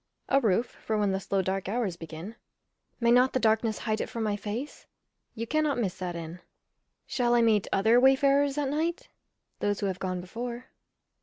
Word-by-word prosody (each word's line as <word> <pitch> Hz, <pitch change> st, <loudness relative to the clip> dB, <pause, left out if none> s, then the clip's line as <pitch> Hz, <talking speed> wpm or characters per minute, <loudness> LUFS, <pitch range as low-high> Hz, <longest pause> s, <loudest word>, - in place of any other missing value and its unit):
A 275 Hz, 0 st, +4 dB
roof 225 Hz, 0 st, +2 dB, 0.2 s
for 220 Hz, -, -1 dB
when 205 Hz, -2 st, +1 dB
the 190 Hz, -, 0 dB
slow 195 Hz, 0 st, -1 dB
dark 190 Hz, 0 st, -2 dB
hours 215 Hz, -5 st, -1 dB
begin. 165 Hz, +5 st, -8 dB, 0.6 s
May 235 Hz, -1 st, +3 dB
not 250 Hz, +2 st, +5 dB
the 260 Hz, -, +2 dB
darkness 220 Hz, -1 st, +2 dB
hide 220 Hz, -1 st, -2 dB
it -, -, -4 dB
from 230 Hz, -3 st, -3 dB
my 210 Hz, -1 st, 0 dB
face? 220 Hz, +7 st, -6 dB, 0.5 s
You 230 Hz, 0 st, -3 dB
cannot 305 Hz, +2 st, +1 dB
miss 200 Hz, -7 st, -1 dB
that 180 Hz, -2 st, -4 dB
inn. 170 Hz, +1 st, -7 dB, 0.7 s
Shall 240 Hz, -1 st, +1 dB
I 235 Hz, -, +4 dB
meet 215 Hz, -3 st, +3 dB
other 220 Hz, +5 st, +4 dB
wayfarers 275 Hz, +2 st, +4 dB
at 285 Hz, -2 st, 0 dB
night? 320 Hz, +4 st, -2 dB, 0.5 s
Those 205 Hz, -1 st, 0 dB
who -, -, 0 dB
have 190 Hz, -2 st, -2 dB
gone 185 Hz, -1 st, -2 dB
before. 235 Hz, +7 st, -6 dB
225 Hz, 185 wpm, -28 LUFS, 195-250 Hz, 0.7 s, not